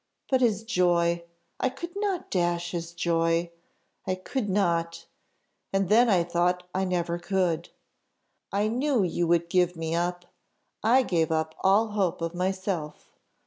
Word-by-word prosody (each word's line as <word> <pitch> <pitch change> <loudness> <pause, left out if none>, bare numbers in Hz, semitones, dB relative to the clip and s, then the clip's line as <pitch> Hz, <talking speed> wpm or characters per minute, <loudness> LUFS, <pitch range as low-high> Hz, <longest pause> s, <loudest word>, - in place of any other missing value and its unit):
But 260 -1 +3
his 220 -4 +2
joy! 175 -5 +1 0.3
I 260 - +1
could 340 +8 -8
not 400 -3 -2
dash 175 -1 0
his 170 -1 -4
joy 170 0 0 0.6
I 185 - +1
could 205 +4 -3
not! 170 -4 0 0.7
and 195 -1 0
then 235 +3 +5
I 180 -5 +4
thought 175 +1 0
I 190 +1 0
never 175 -2 -1
could. 175 -3 0 0.8
I 205 +2 +1
knew 250 0 +1
you 175 -1 0
would 170 0 +2
give 180 0 +2
me 165 0 -3
up; 175 +1 -1 0.6
I 250 +4 +4
gave 165 -7 0
up 160 0 0
all 200 +4 +4
hope 195 -5 0
of 165 0 -2
myself. 185 -4 -3
180 Hz, 145 wpm, -27 LUFS, 170-205 Hz, 0.8 s, then